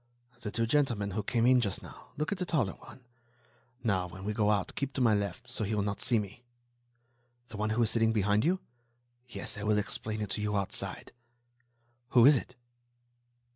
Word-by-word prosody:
"The 110 - -3
two 115 +2 0
gentlemen 115 -6 +1
who 105 - -1
came 115 +3 +1
in 125 0 +5
just 100 -5 -2
now.... - - -12
Look 150 +4 -2
at 200 - -2
the - - 0
taller 130 - +1
one... - - -14 0.8
now, 95 -6 +1
when 95 +2 -10
we 105 +2 -2
go 105 -1 +2
out, 100 -3 +1
keep 140 0 -3
to 135 - -3
my 115 -4 +4
left, 100 -1 -2
so - - -2
he 105 +1 -1
will 105 - +1
not 100 0 -3
see 120 - +3
me." 105 +2 -5 1.1
"The 110 - -8
one 105 +1 -1
who 115 +2 +2
is 110 - +2
sitting 115 -1 +3
behind 105 -1 +2
you?" 185 +5 +1 0.7
"Yes. 110 -3 -4
I - - -5
will 105 0 +2
explain 105 +1 -2
it 105 - -3
to - - -2
you, 105 -1 0
outside." 100 -1 -2 1.1
"Who 120 - +9
is 145 +2 +8
it?" 125 0 -4
110 Hz, 205 wpm, -30 LUFS, 105-120 Hz, 1.1 s, Who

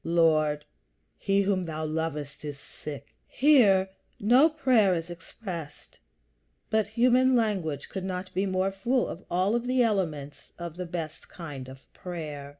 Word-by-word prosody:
"Lord, 155 -3 +2 0.5
he 200 0 +1
whom 190 -2 0
thou 155 -1 -4
lovest 155 -2 -3
is 145 -2 -5
sick." 140 0 -9
Here 245 -9 +5
is - - -39
no 250 +9 +5
prayer 250 - +3
expressed; 170 -1 -7 0.7
but 220 -1 +2
human 250 +3 +4
language 190 - 0
could 190 - -5
not 185 0 -4
be 190 +2 0
more 185 +1 0
full 240 +7 0
of 180 - -7
all 190 +6 +2
the 250 +1 +2
elements 160 -10 -2
of 170 -2 -6
the 180 0 -5
best 165 -3 -6
kind 145 -7 -8
of 135 0 -12
prayer. 155 -6 -6
180 Hz, 145 wpm, -28 LUFS, 155-215 Hz, 0.7 s, Here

